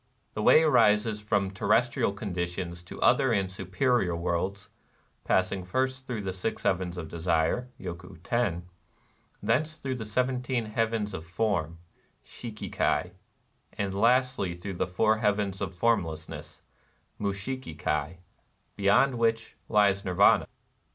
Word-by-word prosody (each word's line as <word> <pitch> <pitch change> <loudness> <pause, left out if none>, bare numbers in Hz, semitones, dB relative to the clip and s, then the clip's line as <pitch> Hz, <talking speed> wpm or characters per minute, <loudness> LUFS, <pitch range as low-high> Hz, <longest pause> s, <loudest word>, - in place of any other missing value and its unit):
The 105 - -3
way 155 +8 +6
rises 105 -7 +3
from 100 -2 0
terrestrial 105 +3 +2
conditions 90 -3 -4
to - - -9
other 130 - +4
and 100 -4 0
superior 95 0 0
worlds, 85 +3 -2 0.3
— - - -39
passing 95 0 +1
first 130 +7 -2
through 115 -5 -3
the 95 -1 -3
Six 95 +4 -3
Heavens 90 -1 0
of 85 -2 -5
Desire 85 +9 0
{Yoku 90 0 -8
Teri); 95 -4 0 0.4
— - - -34
thence 155 +3 +1
through 135 -4 -4
the 110 - -5
Seventeen 125 +1 -1
Heavens 110 -1 -1
of 80 - -5
Form 85 -2 -1 0.5
(^BMM 110 -3 -8
Kai) - - +1 0.2
\ - - -42
— - - -40
and 100 -1 -1
lastly 120 -3 +2
through 95 +3 -6
the 90 - -1
Four 110 +4 +2
Heavens 105 -2 0
of 95 -4 -2
Formlessness 90 -7 -2 0.6
(Mushiki 100 -1 -4
Kai)^ 75 +3 -1 0.6
beyond 115 +6 +3
which 115 -1 0
lies 100 -2 +3
Nirvana. 95 +2 +4
100 Hz, 140 wpm, -28 LUFS, 90-115 Hz, 0.6 s, way